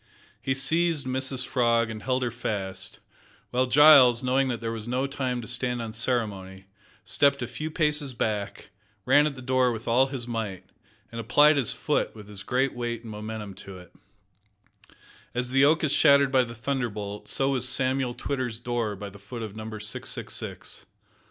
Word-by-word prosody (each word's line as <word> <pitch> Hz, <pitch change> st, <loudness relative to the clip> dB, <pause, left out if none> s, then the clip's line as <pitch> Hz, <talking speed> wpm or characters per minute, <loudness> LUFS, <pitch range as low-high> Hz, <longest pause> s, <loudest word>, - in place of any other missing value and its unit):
He 135 Hz, +1 st, -1 dB
seized 160 Hz, +2 st, +1 dB
Mrs 130 Hz, 0 st, -1 dB
Frog 115 Hz, -3 st, +1 dB
and 110 Hz, -1 st, -7 dB
held 130 Hz, 0 st, 0 dB
her 120 Hz, -, -1 dB
fast, 95 Hz, -5 st, -4 dB, 0.5 s
while 130 Hz, +1 st, +1 dB
Giles, 130 Hz, -3 st, +7 dB
knowing 130 Hz, +1 st, +2 dB
that 120 Hz, -3 st, -2 dB
there 115 Hz, -1 st, -3 dB
was 115 Hz, -1 st, -6 dB
no 125 Hz, +2 st, 0 dB
time 130 Hz, -3 st, -3 dB
to -, -, -9 dB
stand 125 Hz, 0 st, -1 dB
on 115 Hz, -2 st, -5 dB
ceremony, 100 Hz, -5 st, -2 dB, 0.4 s
stepped 140 Hz, -2 st, +2 dB
a -, -, -3 dB
few 155 Hz, +6 st, -5 dB
paces 150 Hz, -4 st, -1 dB
back, 105 Hz, -3 st, -3 dB, 0.3 s
ran 145 Hz, +1 st, +5 dB
at 145 Hz, -, -4 dB
the 130 Hz, -, -10 dB
door 130 Hz, -1 st, +2 dB
with 115 Hz, 0 st, -6 dB
all 125 Hz, +3 st, +4 dB
his 130 Hz, -3 st, -6 dB
might, 105 Hz, -6 st, -4 dB, 0.5 s
and 115 Hz, 0 st, -5 dB
applied 145 Hz, +7 st, +5 dB
his 135 Hz, -5 st, 0 dB
foot 150 Hz, -5 st, -1 dB
with 105 Hz, -2 st, -11 dB
his 100 Hz, -2 st, -8 dB
great 130 Hz, +6 st, 0 dB
weight 120 Hz, -1 st, -4 dB
and 115 Hz, -, -8 dB
momentum 105 Hz, -1 st, -6 dB
to 95 Hz, 0 st, -11 dB
it. 90 Hz, -1 st, -15 dB, 1.4 s
As 125 Hz, 0 st, -1 dB
the 135 Hz, +1 st, +5 dB
oak 155 Hz, +3 st, +3 dB
is 150 Hz, -, +1 dB
shattered 140 Hz, -2 st, +5 dB
by 130 Hz, -2 st, +4 dB
the 115 Hz, 0 st, -9 dB
thunderbolt, 115 Hz, -5 st, -4 dB
so 135 Hz, 0 st, +1 dB
was 130 Hz, -2 st, 0 dB
Samuel 130 Hz, -1 st, 0 dB
Twitter's 125 Hz, -3 st, -3 dB
door 120 Hz, -3 st, -2 dB
by 100 Hz, +1 st, -8 dB
the 100 Hz, -, -14 dB
foot 115 Hz, +4 st, -7 dB
of 105 Hz, -2 st, -7 dB
Number 110 Hz, 0 st, -7 dB
666. 105 Hz, -, -3 dB
125 Hz, 180 wpm, -26 LUFS, 110-135 Hz, 1.4 s, Giles